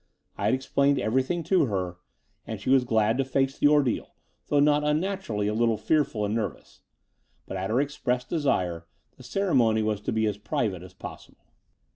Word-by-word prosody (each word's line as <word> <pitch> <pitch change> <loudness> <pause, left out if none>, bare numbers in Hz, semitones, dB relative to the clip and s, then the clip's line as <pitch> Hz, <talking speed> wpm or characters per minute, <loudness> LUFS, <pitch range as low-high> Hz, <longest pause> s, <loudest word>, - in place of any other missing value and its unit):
I 100 - -3
had 110 - +3
explained 140 +1 +1
everjrthing 130 +8 0
to 185 -3 +3
her, 90 -4 -3 0.5
and - - -5
she 130 - -1
was 135 -2 +5
glad 110 +1 +2
to - - +3
face 135 +1 -1
the - - +5
ordeal, 145 -5 +1 0.3
though 145 - +2
not 150 +1 +4
un 150 +1 +2
naturally 180 - -2
a 105 - 0
little 115 0 +2
fearful 115 -3 +1
and 105 - -2
nervous: 105 -8 -4 0.6
but, - - -6
at 95 +1 -3
her 115 +4 +2
expressed 125 -3 -1
desire, 90 - -1 0.3
the - - -14
ceremony 120 - +2
was 105 -1 -1
to - - -3
be 110 0 +1
as 105 -1 -2
private 105 -2 -2
as 90 - -13
possible. - - -11
120 Hz, 185 wpm, -26 LUFS, 105-145 Hz, 0.6 s, was